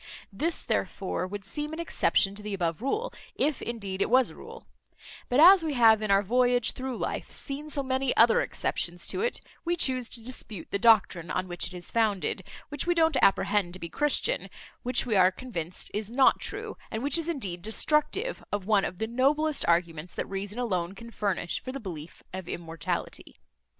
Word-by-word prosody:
This 320 Hz, +11 st, -1 dB
therefore 185 Hz, -2 st, -2 dB
would 200 Hz, +1 st, -7 dB
seem 300 Hz, +8 st, -4 dB
an 320 Hz, -, -5 dB
exception 200 Hz, -11 st, +1 dB
to 205 Hz, -, -6 dB
the 210 Hz, -1 st, -4 dB
above 170 Hz, -1 st, -2 dB
rule, 430 Hz, -, -1 dB, 0.2 s
if 300 Hz, -2 st, 0 dB
indeed 200 Hz, -5 st, -4 dB
it -, -, +1 dB
was 255 Hz, +1 st, +4 dB
a -, -, -14 dB
rule; -, -, -11 dB, 0.6 s
but 250 Hz, -, +2 dB
as 360 Hz, +2 st, +9 dB
we 305 Hz, -3 st, -2 dB
have 225 Hz, -3 st, +6 dB
in 215 Hz, -, -2 dB
our 195 Hz, 0 st, +4 dB
voyage 245 Hz, +2 st, +3 dB
through 260 Hz, -2 st, -5 dB
life -, -, -3 dB
seen 290 Hz, +2 st, -5 dB
so 285 Hz, -2 st, 0 dB
many 260 Hz, 0 st, -1 dB
other 230 Hz, 0 st, +6 dB
exceptions 175 Hz, 0 st, -2 dB
to -, -, -1 dB
it, 480 Hz, +2 st, 0 dB, 0.2 s
we 345 Hz, 0 st, 0 dB
chuse 255 Hz, -7 st, +1 dB
to -, -, -2 dB
dispute 220 Hz, -7 st, -6 dB
the 200 Hz, -, 0 dB
doctrine 200 Hz, -6 st, +4 dB
on 185 Hz, +1 st, -2 dB
which 175 Hz, -1 st, -1 dB
it 185 Hz, -, -10 dB
is 175 Hz, -, -4 dB
founded, 215 Hz, -4 st, 0 dB, 0.3 s
which 290 Hz, +3 st, -4 dB
we 350 Hz, -, +3 dB
don't 320 Hz, -3 st, +3 dB
apprehend 195 Hz, -2 st, +3 dB
to 185 Hz, -, -4 dB
be 170 Hz, -, -6 dB
Christian, 295 Hz, -, 0 dB, 0.3 s
which 250 Hz, +2 st, +1 dB
we 230 Hz, -4 st, 0 dB
are 185 Hz, -1 st, +6 dB
convinced 185 Hz, -7 st, -5 dB
is 210 Hz, 0 st, -3 dB
not 260 Hz, +3 st, +4 dB
true, -, -, -5 dB
and 220 Hz, +2 st, -4 dB
which 285 Hz, +3 st, +2 dB
is 330 Hz, 0 st, -3 dB
indeed 195 Hz, -, -3 dB
destructive 300 Hz, -, 0 dB
of 205 Hz, -2 st, -2 dB
one 205 Hz, -2 st, +3 dB
of 180 Hz, -, -5 dB
the 220 Hz, -, -1 dB
noblest 280 Hz, +6 st, +1 dB
arguments 170 Hz, -1 st, 0 dB
that -, -, -2 dB
reason 200 Hz, +2 st, -5 dB
alone 190 Hz, -7 st, -1 dB
can 235 Hz, +1 st, -11 dB
furnish 200 Hz, -5 st, -1 dB
for 255 Hz, -, -6 dB
the 275 Hz, -, -5 dB
belief 170 Hz, -, -8 dB
of 185 Hz, -2 st, -6 dB
immortality. 165 Hz, -3 st, -5 dB
225 Hz, 195 wpm, -28 LUFS, 190-275 Hz, 0.6 s, as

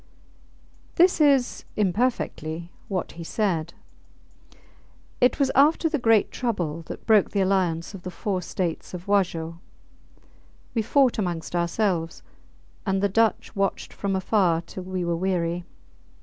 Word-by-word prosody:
IV -, -, -31 dB
This 355 Hz, -1 st, +4 dB
is, 275 Hz, -4 st, +3 dB
imperfectly, 180 Hz, -6 st, -1 dB, 0.2 s
what 190 Hz, -3 st, -3 dB
he 170 Hz, -, -8 dB
said 170 Hz, -3 st, -1 dB, 1.5 s
It 250 Hz, -, +4 dB
was 275 Hz, -2 st, +2 dB
after 310 Hz, +4 st, +4 dB
the 305 Hz, -2 st, -1 dB
great 225 Hz, -3 st, +3 dB
trouble 175 Hz, -10 st, -2 dB
that -, -, -8 dB
broke 215 Hz, -3 st, +5 dB
the 200 Hz, -, 0 dB
alliance 185 Hz, -3 st, 0 dB
of 195 Hz, -, -8 dB
the 185 Hz, -, -6 dB
four 185 Hz, +1 st, -2 dB
states 180 Hz, 0 st, -3 dB
of 180 Hz, +1 st, -9 dB
Wajo. 170 Hz, -5 st, 0 dB, 1.1 s
We 230 Hz, -, +1 dB
fought 255 Hz, +1 st, +3 dB
amongst 175 Hz, -3 st, -3 dB
ourselves, 170 Hz, -1 st, 0 dB, 0.6 s
and 195 Hz, -1 st, 0 dB
the 200 Hz, -, +3 dB
Dutch 225 Hz, +3 st, +1 dB
watched 195 Hz, 0 st, -1 dB
from 195 Hz, -1 st, -2 dB
afar 185 Hz, -3 st, +2 dB
till 185 Hz, -, -8 dB
we 185 Hz, -1 st, -3 dB
were 170 Hz, 0 st, 0 dB
weary. 175 Hz, -1 st, -1 dB
190 Hz, 135 wpm, -25 LUFS, 170-220 Hz, 1.5 s, broke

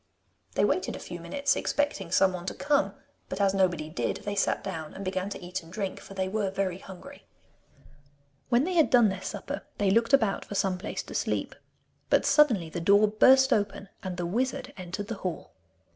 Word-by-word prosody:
They -, -, +3 dB
waited -, -, 0 dB
a -, -, -7 dB
few -, -, -7 dB
minutes 285 Hz, 0 st, 0 dB
expecting 290 Hz, -, -1 dB
someone 185 Hz, -1 st, +2 dB
to -, -, -3 dB
come, 290 Hz, 0 st, +1 dB, 0.3 s
but -, -, -4 dB
as 195 Hz, -1 st, +3 dB
nobody 175 Hz, -5 st, +1 dB
did, 155 Hz, -, -2 dB
they 205 Hz, -, -2 dB
sat 200 Hz, -, 0 dB
down 160 Hz, -5 st, -6 dB
and 195 Hz, -, -6 dB
began 185 Hz, +1 st, -2 dB
to -, -, -6 dB
eat 185 Hz, +2 st, -4 dB
and 165 Hz, 0 st, -15 dB
drink, 195 Hz, -1 st, -4 dB
for 195 Hz, -, -12 dB
they 190 Hz, -1 st, -1 dB
were 200 Hz, 0 st, -1 dB
very 190 Hz, -1 st, -2 dB
hungry. 190 Hz, -2 st, -12 dB, 1.2 s
When 240 Hz, +1 st, +4 dB
they 365 Hz, +4 st, -1 dB
had 325 Hz, -3 st, +4 dB
done 240 Hz, -4 st, +6 dB
their 190 Hz, -1 st, -4 dB
supper -, -, -5 dB, 0.2 s
they 200 Hz, -2 st, +2 dB
looked 230 Hz, +4 st, +3 dB
about 220 Hz, -7 st, +3 dB
for 205 Hz, -, -8 dB
some 190 Hz, -2 st, 0 dB
place 215 Hz, -, -4 dB
to -, -, -10 dB
sleep. -, -, -1 dB, 0.6 s
But -, -, +3 dB
suddenly 235 Hz, -, +4 dB
the 175 Hz, -, -4 dB
door 200 Hz, +4 st, +5 dB
burst 265 Hz, +5 st, +5 dB
open, 200 Hz, -1 st, -1 dB
and 185 Hz, -2 st, -5 dB
the 175 Hz, -, -2 dB
wizard 255 Hz, +7 st, -2 dB
entered 185 Hz, +2 st, -6 dB
the 230 Hz, -2 st, -4 dB
hall. 180 Hz, -3 st, -5 dB
195 Hz, 200 wpm, -28 LUFS, 185-230 Hz, 1.2 s, done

